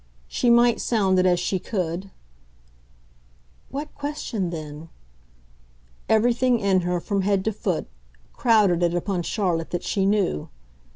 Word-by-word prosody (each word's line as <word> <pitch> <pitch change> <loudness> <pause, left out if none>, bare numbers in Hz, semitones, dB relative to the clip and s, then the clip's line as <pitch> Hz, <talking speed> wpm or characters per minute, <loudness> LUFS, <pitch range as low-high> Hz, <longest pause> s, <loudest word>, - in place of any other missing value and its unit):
She 240 - 0
might 235 0 +4
sound 195 -5 +2
it 185 - +3
as 175 -1 +3
she 185 +1 -1
could 180 -1 -3 1.6
"What 295 +2 -6
question 285 -10 -3
then?" 155 -1 -7 1.2
everything 240 +3 +3
in 195 -2 +2
her, 175 0 -1
from 200 +3 -1
head 195 0 +1
to 220 - 0
foot, 185 -4 -2 0.5
crowded 210 -7 +3
it 175 0 +1
upon 180 +1 -1
Charlotte 170 -3 -1
that 175 - -3
she 195 -2 0
knew. 200 - 0
195 Hz, 130 wpm, -24 LUFS, 175-220 Hz, 1.6 s, might